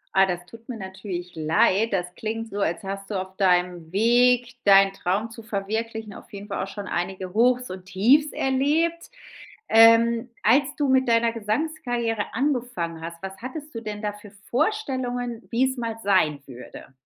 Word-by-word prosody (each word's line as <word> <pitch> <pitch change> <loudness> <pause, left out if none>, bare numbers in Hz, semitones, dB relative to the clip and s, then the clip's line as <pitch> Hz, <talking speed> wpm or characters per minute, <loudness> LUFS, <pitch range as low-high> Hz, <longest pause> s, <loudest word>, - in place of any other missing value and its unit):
Ah, 195 0 +5
das 175 -1 -3
tut 230 +4 -15
mir 245 - -5
natürlich 190 -2 -6
leid. 165 +7 +2
Das 185 -3 0
klingt 225 +3 -4
so, 205 - -4
als 175 +3 -1
hast 195 +1 -6
du 205 - -3
auf 190 0 -7
deinem 180 -3 +1
Weg, 245 +4 +3
deinen 195 -1 +6
Traum 200 +4 -2
zu 230 - -10
verwirklichen 220 +1 -4
auf - - -13
jeden 200 0 -9
Fall 200 - -3
auch 195 - -5
schon 205 0 -7
einige 185 0 -4
Hochs 250 +2 +2
und 185 0 -8
Tiefs 255 +11 +3
erlebt. 300 +6 0 0.6
Ähm, 230 +1 +6
als 275 +6 +3
du 290 -2 +1
mit 260 0 +3
deiner 230 0 +3
Gesangskarriere 235 -1 -2
angefangen 240 - -2
hast, 170 0 -8
was 190 0 -7
hattest 295 +4 -8
du 230 - -4
denn 210 -1 -6
da 210 -1 -2
für 205 -1 -14 0.2
Vorstellungen, 250 - -1
wie 245 +3 +3
es 260 - -6
mal 230 -2 -3
sein 155 -8 +2
würde? 125 +1 -11
220 Hz, 170 wpm, -24 LUFS, 190-245 Hz, 0.6 s, deinen